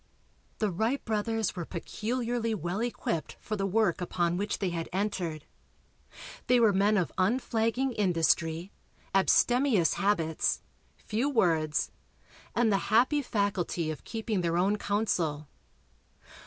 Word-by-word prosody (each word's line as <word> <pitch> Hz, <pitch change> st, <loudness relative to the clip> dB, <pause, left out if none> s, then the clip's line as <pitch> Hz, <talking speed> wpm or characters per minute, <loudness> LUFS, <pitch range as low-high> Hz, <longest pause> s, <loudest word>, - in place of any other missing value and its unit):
The 215 Hz, -2 st, 0 dB
Wright 225 Hz, +10 st, -1 dB
brothers 220 Hz, 0 st, -1 dB
were 175 Hz, -, -3 dB
peculiarly 230 Hz, +6 st, -2 dB
well 175 Hz, +2 st, -3 dB
equipped 230 Hz, -8 st, -3 dB
for 215 Hz, -, -4 dB
the 195 Hz, -1 st, -1 dB
work 195 Hz, -3 st, +1 dB
upon 175 Hz, -1 st, 0 dB
which 205 Hz, +3 st, -2 dB
they 190 Hz, -3 st, -1 dB
had 165 Hz, -1 st, -4 dB
entered. 180 Hz, -5 st, -2 dB, 1.0 s
They 250 Hz, 0 st, +5 dB
were 220 Hz, -3 st, +5 dB
men 205 Hz, +2 st, +3 dB
of 180 Hz, -, 0 dB
unflagging 230 Hz, +4 st, +1 dB
industry, 170 Hz, -3 st, +1 dB, 0.4 s
abstemious 230 Hz, -, +3 dB
habits, 170 Hz, -6 st, +1 dB, 0.3 s
few 230 Hz, +6 st, -1 dB
words 165 Hz, -, +1 dB, 0.6 s
and 235 Hz, -2 st, +3 dB
the 195 Hz, -, +4 dB
happy 255 Hz, +7 st, +4 dB
faculty 195 Hz, -, -1 dB
of 155 Hz, -, -8 dB
keeping 220 Hz, -4 st, -2 dB
their 170 Hz, 0 st, 0 dB
own 200 Hz, +4 st, +2 dB
counsel. 175 Hz, -9 st, -1 dB
200 Hz, 125 wpm, -29 LUFS, 175-225 Hz, 1.0 s, They